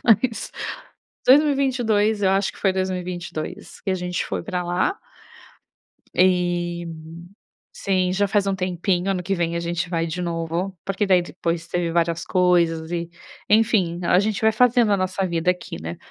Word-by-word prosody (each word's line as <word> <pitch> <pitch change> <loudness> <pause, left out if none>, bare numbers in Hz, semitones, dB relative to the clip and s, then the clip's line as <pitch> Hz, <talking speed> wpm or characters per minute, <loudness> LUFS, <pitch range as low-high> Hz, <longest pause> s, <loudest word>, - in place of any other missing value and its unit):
Mas, 230 +1 +2 0.8
2022. 250 -7 +3
Eu 190 - +4
acho 195 +1 +1
que - - -16
foi 195 - +2
2022 180 -1 -4
que 195 - -3
a - - +2
gente 180 -1 -2
foi - - -3
pra 180 -4 -2
lá. 175 - 0 1.2
E, 175 -1 +1 0.9
sim, 185 -2 0
já 200 +1 +1
faz 200 0 +1
um 195 - +1
tempinho. 185 0 -1
Ano 185 -2 -1
que 195 +3 -1
vem 170 -2 -1
a - - -1
gente 170 0 -2
vai 165 -1 0
de 165 +3 -4
novo, 170 +2 -3
porque 195 +1 -1
daí 185 -2 +4
depois 170 -1 -3
teve 170 -1 -1
várias 170 0 0
coisas 170 -3 +2
e, 170 -1 -2 0.4
enfim, 210 -5 +3
então 175 0 -3
a - - +6
gente 210 0 -1
vai 220 - +4
fazendo 240 -2 +4
a - - +4
nossa 185 +1 -1
vida 170 0 +1
aqui, 180 - -5
né? 80 +1 -5
180 Hz, 170 wpm, -23 LUFS, 175-200 Hz, 1.2 s, a